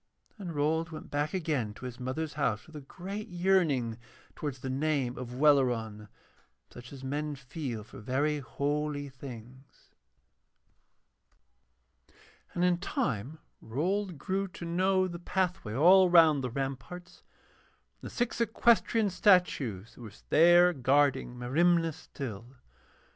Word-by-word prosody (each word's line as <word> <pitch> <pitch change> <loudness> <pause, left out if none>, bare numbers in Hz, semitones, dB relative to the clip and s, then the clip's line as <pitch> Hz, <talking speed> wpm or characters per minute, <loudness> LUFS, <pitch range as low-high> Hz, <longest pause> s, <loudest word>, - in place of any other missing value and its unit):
And 175 -5 -6
Rold 160 +3 0
went 160 - -9
back 145 +1 -1
again 150 - -2
to - - -10
his 125 -1 -7
mother's 130 +5 -3
house 110 -8 -1
with 160 - -16
a 150 - -7
great 195 +9 -7
yearning 170 -11 +1 0.4
towards 145 -4 -4
the - - -5
name 135 -3 0
of 125 -1 -7
Welleran, 120 -7 +2 0.6
such 120 0 -12
as 135 -2 -10
men 145 +2 -3
feel 130 -4 -6
for 105 - -13
very 140 +7 0
holy 145 +2 -2
things. 130 0 -12 2.6
And 175 - 0
in 175 -1 +2
time 155 - -2 0.2
Rold 180 - -2
grew 195 +7 -2
to 175 -1 -9
know 185 +2 +2
the 170 -1 -7
pathway 180 - -2
all 180 +6 +6
round 160 -5 +6
the 125 - -2
ramparts, 135 +7 -6 0.8
and - - -7
the - - -14
six 240 -1 -1
equestrian 225 -1 +2
statues 145 - +2
that - - -15
were 110 -3 -9 0.2
there 175 +3 +6
guarding 135 -2 +1
Merimna 165 +6 +2
still. 125 -4 -8
145 Hz, 130 wpm, -30 LUFS, 130-175 Hz, 2.6 s, all